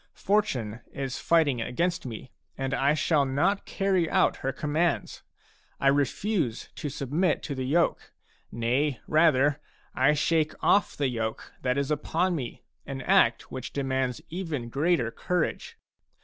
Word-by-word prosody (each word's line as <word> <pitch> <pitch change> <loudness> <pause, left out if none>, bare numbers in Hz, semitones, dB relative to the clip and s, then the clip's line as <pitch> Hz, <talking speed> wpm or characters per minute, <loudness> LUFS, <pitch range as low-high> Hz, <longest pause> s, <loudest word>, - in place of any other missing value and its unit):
Fortune 125 - 0
is 135 -2 -4
fighting 150 -8 +2
against 170 +6 -1
me, 120 +2 -8 0.3
and 135 0 -2
I 140 +3 +2
shall 155 -1 +2
not 165 +10 0
carry 190 -4 +1
out - - +3
her 135 - -2
commands. 155 +5 -1 0.6
I 135 - +4
refuse 145 - 0
to 145 - -3
submit 150 +6 0
to 145 - -4
the 130 -1 -3
yoke; 170 +5 +1 0.4
nay 125 +4 0
rather, 150 -3 +3 0.3
I 135 +4 +3
shake 155 +1 +1
ofF 200 - +3
the 140 - +1
yoke 110 -2 -4
that 125 +1 0
is 140 +1 -1
upon 165 +5 0
me, 125 - -6
— 75 0 -44
an 135 -1 -5
act 115 -1 +3
which 130 -1 -6
demands 130 -2 -1
even 160 -9 -4
greater 140 -3 +1
courage. 180 +3 -2
140 Hz, 145 wpm, -27 LUFS, 130-165 Hz, 0.6 s, I